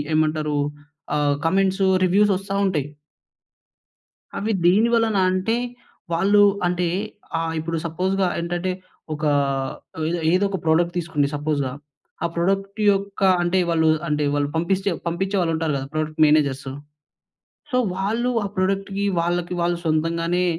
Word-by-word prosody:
ఏమంటారు? 155 -1 +1 0.6
ఆహ్, 145 -1 +2
comments 190 +2 +2 0.2
reviews 200 +3 +4
వస్తా 195 +1 -5
ఉంటాయి. 150 -7 0 1.5
అవి 215 +3 -1
దేని 205 +7 +5
వలన 225 -3 +2
అంటే 185 +5 0 0.6
వాళ్ళు 200 +5 +4 0.3
అంటే 180 0 0 0.5
ఆహ్, 165 0 -2
ఇప్పుడు 165 +1 -3
సపోజ్‌గా 185 +3 0
ఏంటంటే 175 +2 -2 0.4
ఒక 150 +1 -7 0.8
ఏదో 170 +1 -1
ఏదో 185 +3 +3
ఒక 195 - -2
ప్రొడక్ట్ 170 +2 +2
తీసుకోండి 160 -4 0
సపోజ్‌గా. 145 -3 -1 0.5
ఆ - - +2
ప్రొడక్ట్ 195 +4 -1
యొక్క 200 0 -4 0.2
అంటే 175 +2 +1
వాళ్ళు 160 -1 +2 0.2
అంటే 150 -1 0
వాళ్ళు 145 0 0
పంపిస్తే 190 +4 0 0.2
పంపించే 190 +4 -1
వాళ్ళు 165 -2 +1
ఉంటారు 160 -2 -1
గదా! 135 0 -5
Product 155 0 -3
managers. 140 -3 +2 1.0
సో 250 - +2 0.2
వాళ్ళు 220 +6 0 0.2
ఆ - - -1
ప్రాడక్ట్‌కి 195 +1 -1 0.2
వాళ్ళకి 175 +1 -1
వాళ్ళు 175 0 +1
సొంతంగానే 165 +3 +1
175 Hz, 130 wpm, -22 LUFS, 155-195 Hz, 1.5 s, దేని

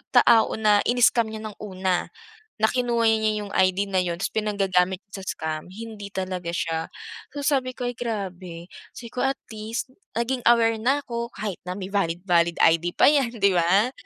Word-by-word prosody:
tao 225 -1 +5
na 210 -1 +4
ini-scam 240 -1 +4
niya 220 0 -7
ng 215 -2 -8
una, 185 -3 -1 0.5
na 220 0 +2
kinuha 240 -2 0
niya 215 -1 +1
yung 200 - -9
ID 190 +1 +2
na 185 - +2
yun 175 -2 -1
tapos - - -1
pinanggagamit 195 -3 0
sa 195 - -7
scam, 155 +1 -4
hindi 210 +1 -8
talaga 185 -2 -3
siya. 165 -1 -2 0.5
So, 285 - -4
sabi 260 -3 0
ko, 250 - -6
"Ay, 245 -1 -2
grabe," 185 -6 -5 0.2
say 235 -1 -9
ko 250 - -6
at 270 0 +1 0.2
least 220 +4 -5 0.2
naging 240 +2 -1
aware 230 -2 +4
na 270 +5 +1
ako 235 0 -4
kahit 205 -5 -4
na 180 - -3
may 195 -1 -6
valid-valid 170 -2 +1
ID 165 +2 +3
pa - - +6
yan, 255 -5 +1
di 200 -2 +3
ba? 185 +7 +3
210 Hz, 180 wpm, -24 LUFS, 185-235 Hz, 0.5 s, pa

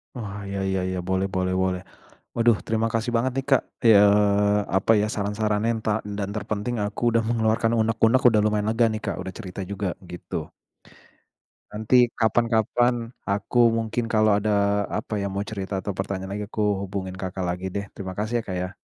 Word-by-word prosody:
Oh, 105 -4 -6
iya 100 0 -4
iya 95 0 0
iya, 95 0 -2
boleh 95 +1 0
boleh 95 -1 -1
boleh. 90 -1 -1 0.5
Waduh 115 -2 +3
terima 110 0 +1
kasih 115 +1 -1
banget 125 +3 +1
nih, 135 - -1
Kak, 135 - +5 0.2
ya 115 - +6
eee, 105 0 +4 0.2
apa 95 +4 +3
ya 105 - +1
saran-sarannya 105 +2 0
ntah 110 0 0
n 105 - -5
dan 100 -1 -2
terpenting 110 +3 -3
aku 105 +1 -4
udah 115 - +4
mengeluarkan 115 0 +1
unek-unek 115 +3 +3
udah 110 -3 +3
lumayan 105 -1 +1
lega 115 +1 +3
nih, 110 0 -3
Kak, - - -2
udah 95 0 -6
cerita 95 -3 -7
juga, 100 0 -3
begitu. 90 -1 -6 1.2
Nanti 120 +4 +3
kapan-kapan 115 +1 +1 0.2
aku 105 +4 +3
mungkin 115 +1 -2
kalau 110 -1 +3
ada 100 -1 +1
apa 105 - -3
ya, 100 - -1
mau 100 +1 -3
cerita 100 -2 -6
atau 100 - -2
pertanyaan 95 0 -4
lagi 105 +1 -3
aku 105 0 -2 0.2
hubungin 95 -1 -5
Kakak 95 0 -4
lagi 90 +1 -3
deh, 100 0 -2
terima 95 -1 -7
kasih 110 +4 -1
ya, - - -6
Kak, 95 - -3
ya. 90 0 -2
105 Hz, 185 wpm, -24 LUFS, 95-115 Hz, 1.2 s, ya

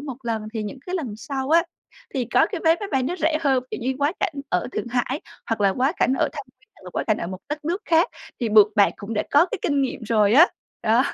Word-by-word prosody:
một 275 -4 -6
lần 225 -2 -2
thì 220 - -2
những 210 +6 -6
cái 360 - -3
lần 275 - -3
sau 275 0 -4
á, 335 +1 +6 0.5
thì 255 -3 0
có - - +3
cái - - -5
vé 325 +1 +5
máy 410 - -4
bay 265 -1 +2
nó 350 +8 -2
rẻ 315 -1 +1
hơn, 265 -4 +2
kiểu - - -5
như 260 +3 -1
quá 290 +3 +1
cảnh 315 - 0
ở 180 - 0
Thượng - - -3
Hải 255 +4 -1 0.3
hoặc 225 -2 -2
là 200 - +4
quá 260 - +1
cảnh 260 - +2
ở - - +2
Thâm 285 -4 -7
Quyến 420 - -30
hoặc - - -20
là - - -8
quá - - -2
cảnh 215 - +2
ở - - -3
một 185 +1 -6
đất 295 0 -5
nước 350 +6 -2
khác 330 +6 +3 0.3
thì 235 - 0
buộc 210 0 +5
bạn 200 -2 +5
cũng 205 +3 -6
đã 210 - +1
có 295 +5 +5
cái - - -4
kinh 285 -2 +1
nghiệm 255 -3 -3
rồi 215 -2 +3
á, 315 +9 +8 0.4
đó. 230 +4 +4
265 Hz, 280 wpm, -23 LUFS, 220-310 Hz, 0.5 s, á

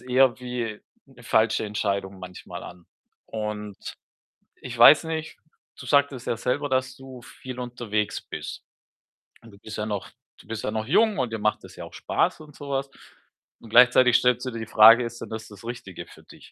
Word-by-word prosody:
eher 125 0 +2
wie 120 -4 -4 0.3
'ne 130 -2 -18
falsche 110 -1 +2
Entscheidung 100 -2 -2
manchmal 90 0 -9
an. 90 -1 -12 0.4
Und 105 -2 -5 0.8
ich 120 -2 -9
weiß 145 +7 +8
nicht, 160 -1 -5 0.4
du 125 - -10
sagtest 140 -2 +1
ja 115 - 0
selber, 145 +5 -1
dass 130 -1 -1
du 130 -2 -12
viel 125 +1 -10
unterwegs 115 -4 -3
bist. - - -7 0.8
Und 115 - -15
du 100 - -16
bist 110 +1 -9
ja 105 - -2
noch 105 -2 -4 0.3
du - - -17
bist 110 -1 -5
ja - - -1
noch 110 0 -3
jung 220 -2 +3
und 125 -3 -1
dir 110 - -3
macht 105 0 0
es - - -13
ja - - -8
auch - - -14
Spaß - - -1
und 150 -2 -14
so 145 - -9
was. 135 0 -2 0.7
Und 115 - -14
gleichzeitig 125 +1 +6
stellst 125 0 +1
du - - -2
dir 115 - -6
die 110 - -5
Frage, 115 +2 +8
ist 115 0 -8
denn - - -7
das 110 0 -7
das 105 0 -14
Richtige 120 -7 -8
für - - -17
dich? - - -17
120 Hz, 195 wpm, -25 LUFS, 110-130 Hz, 0.8 s, weiß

